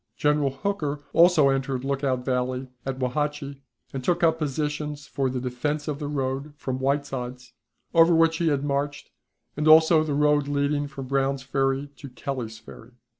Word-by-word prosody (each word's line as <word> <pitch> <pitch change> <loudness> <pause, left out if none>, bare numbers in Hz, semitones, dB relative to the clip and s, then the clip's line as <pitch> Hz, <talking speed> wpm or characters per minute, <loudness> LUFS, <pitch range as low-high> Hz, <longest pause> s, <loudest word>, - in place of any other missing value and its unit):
General 150 -1 +2
Hooker 145 -1 -3
also 165 -4 +6
entered 135 -1 -1
Lookout 135 -2 -1
Valley 130 0 -1 0.2
at 135 -1 -2
Wauhatchie, 140 +2 -2 0.3
and 135 -2 -4
took 175 +4 +1
up 160 -1 +3
positions 150 0 -3
for 135 -2 -1
the 130 0 -3
defense 140 +4 -3
of 150 -2 -3
the 145 - -4
road 140 +1 -3
from 130 -2 -3
Whiteside's, 130 -2 -3 0.4
over 165 0 +6
which 165 0 +4
he 170 - 0
had 145 -3 +1
marched, 145 0 -2 0.4
and 150 +1 -1
also 160 0 +7
the 150 -2 -2
road 150 -1 +3
leading 145 0 0
from 140 -2 -8
Brown's 135 0 0
Ferry 135 0 0
to 140 - -9
Kelly's 125 -3 -5
Ferry. 110 +2 -14
140 Hz, 165 wpm, -25 LUFS, 130-150 Hz, 0.4 s, also